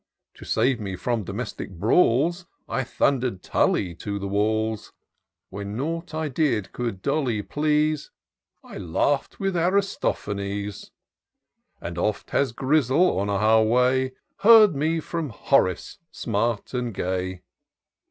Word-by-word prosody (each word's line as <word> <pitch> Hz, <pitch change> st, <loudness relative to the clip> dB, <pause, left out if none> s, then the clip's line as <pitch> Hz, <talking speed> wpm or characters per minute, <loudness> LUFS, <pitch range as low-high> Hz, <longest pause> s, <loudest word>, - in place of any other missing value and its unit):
To -, -, -13 dB
save 120 Hz, +2 st, +1 dB
me 100 Hz, -3 st, -4 dB
ftom 110 Hz, +3 st, -2 dB
domestic 105 Hz, +5 st, -5 dB
brawls, 140 Hz, -, +2 dB, 0.2 s
I 135 Hz, -, -1 dB
thunder'd 125 Hz, -5 st, 0 dB
TuUy 90 Hz, -3 st, +1 dB
to 100 Hz, -1 st, -4 dB
the 100 Hz, 0 st, -4 dB
walls: 110 Hz, +2 st, -1 dB, 0.6 s
When 100 Hz, +2 st, -5 dB
nought 165 Hz, +4 st, -4 dB
I 160 Hz, 0 st, -1 dB
did 130 Hz, -9 st, 0 dB
could 115 Hz, -6 st, -4 dB
Dolly 120 Hz, -9 st, 0 dB
please, 150 Hz, +2 st, 0 dB, 0.5 s
I -, -, -9 dB
laugh'd 135 Hz, -, 0 dB
with 195 Hz, -2 st, -1 dB
Aristophanes, 105 Hz, -, -1 dB, 0.9 s
And 85 Hz, 0 st, -6 dB
oft 105 Hz, +3 st, -2 dB
has 140 Hz, -3 st, +1 dB
Grizzle, 140 Hz, -, +2 dB
on 100 Hz, +1 st, -1 dB
our 110 Hz, +2 st, +4 dB
way. 125 Hz, +3 st, +2 dB, 0.2 s
Heard 215 Hz, -4 st, +7 dB
me 155 Hz, +4 st, 0 dB
ftom 160 Hz, -1 st, -4 dB
Horace 105 Hz, -6 st, 0 dB
smart 115 Hz, 0 st, -2 dB
and 120 Hz, -4 st, -3 dB
gay. 95 Hz, 0 st, -3 dB
120 Hz, 125 wpm, -24 LUFS, 100-150 Hz, 0.9 s, Heard